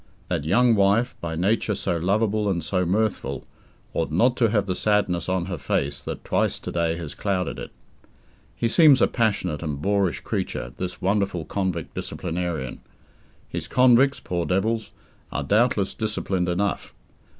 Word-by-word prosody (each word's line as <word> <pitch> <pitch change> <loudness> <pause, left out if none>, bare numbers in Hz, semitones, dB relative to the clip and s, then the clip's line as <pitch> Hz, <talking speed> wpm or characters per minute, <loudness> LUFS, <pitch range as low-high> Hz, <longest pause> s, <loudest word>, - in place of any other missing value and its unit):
That 75 - -1
young 120 +8 +4
wife, 105 +4 +3
by 80 -1 -3
nature 105 +4 +1
so 95 -2 -1
lovable 105 +4 +1
and 85 -4 -1
so 90 +1 0
mirthful, 110 +3 -1 0.5
ought - - -1
not 120 +10 +3
to 115 -3 +3
have 105 -1 +1
the 95 - -1
sadness 95 -3 +1
on 95 -2 0
her 90 -4 -5
face 70 0 -1
that - - -6
twice - - +1
to - - -6
day 85 -1 0
has 85 -4 -6
clouded 95 -3 -2
it. - - -6 0.9
He 115 - 0
seems 145 +2 +6
a - - +6
passionate 100 - 0
and 75 -4 -3
boorish 100 +1 +1
creature, - - -3
this 90 -1 -5
wonderful 95 -4 0
convict 95 -5 -3
disciplinarian. 85 -7 -4 0.7
His - - -5
convicts 130 +2 +4
poor 85 -1 -3
devils 110 +4 0 0.4
are 70 - -2
doubtless 105 - +2
disciplined 100 -4 -1
enough. 95 +3 -2
95 Hz, 155 wpm, -24 LUFS, 85-110 Hz, 0.9 s, seems